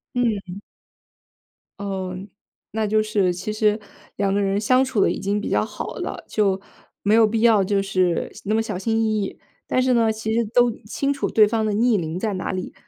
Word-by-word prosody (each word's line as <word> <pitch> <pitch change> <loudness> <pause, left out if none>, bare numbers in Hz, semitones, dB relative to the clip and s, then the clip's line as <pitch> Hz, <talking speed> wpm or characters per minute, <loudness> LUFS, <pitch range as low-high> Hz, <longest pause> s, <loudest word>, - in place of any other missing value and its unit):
嗯。 205 -6 -1 1.2
哦， 190 -2 -4 0.5
那 220 +1 -1
就 215 +1 +2
是 205 -4 +1
其 185 +4 -4
实 215 0 +2 0.4
两 195 -1 0
个 205 - +1
人 195 0 +1
相 255 +5 +3
处 260 -5 -1
得 - - +4
已 - - -4
经 200 +1 -1
比 - - -4
较 - - +2
好 - - -6
了， - - -5
就， 195 -3 +1 0.4
没 205 - +3
有 225 0 +6
必 220 +1 -1
要 225 -4 +5
就 195 +1 +1
是 185 -3 0
那 215 +2 +1
么 225 - +2
小 215 -4 -4
心 225 +4 0
翼 215 -1 +1
翼。 195 - -6 0.3
但 255 - +2
是 255 -1 +2
呢， 230 -2 +3
其 220 0 -3
实 235 +1 +2
都 245 -1 +5
清 275 +6 -1
楚 280 - -2
对 215 -1 +5
方 220 0 0
的 215 - 0
逆 230 +1 +3
鳞 165 -2 -3
在 215 0 -1
哪 185 - -3
里， 185 -1 -5
210 Hz, 225 characters per minute, -22 LUFS, 195-225 Hz, 1.2 s, 有